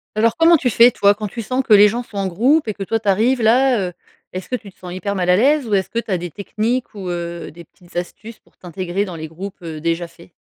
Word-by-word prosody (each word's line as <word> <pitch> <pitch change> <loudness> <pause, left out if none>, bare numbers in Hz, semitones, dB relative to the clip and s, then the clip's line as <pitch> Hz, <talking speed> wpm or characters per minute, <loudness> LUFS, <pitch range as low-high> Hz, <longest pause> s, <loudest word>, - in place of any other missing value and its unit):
Alors, 225 +1 +2
comment 330 +1 +6
tu 255 -4 0
fais, 235 +3 +7
toi, 200 -4 +3
quand 210 +1 -5
tu 230 +4 -6
sens 255 +5 -1
que 230 - +3
les 205 0 +8
gens 235 +4 -2
sont 225 -4 -11
en 195 - -1
groupe 245 - +2
et 215 - -1
que 200 - -6
toi, 225 +4 -1
tu 210 - -10
arrives 230 +6 +2
là, 250 +2 +4
heu? - - -14 0.4
Est-ce 185 0 -6
que 255 - -1
tu 210 -5 -9
te - - -35
sens 180 - -9
hyper 200 +3 -3
mal 180 -2 -1
à 180 - +6
l'aise? 275 +5 +2
Ou 215 - -2
est-ce 190 -1 0
que 230 - -2
tu 235 - -8
as 185 - +2
des 175 0 -6
techniques 225 +6 -3
ou 190 -3 -6
heu, 170 -1 -5
des 170 +2 -12
petites 175 +2 -23
astuces 210 +6 -6
pour - - -32
t'intégrer 185 +2 -3
dans 180 -4 -7
les 160 -1 -6
groupes, 185 +5 -9
heu, 160 -2 -7
déjà 170 +1 -1
faits? 170 +1 -18
200 Hz, 285 wpm, -19 LUFS, 180-230 Hz, 0.4 s, les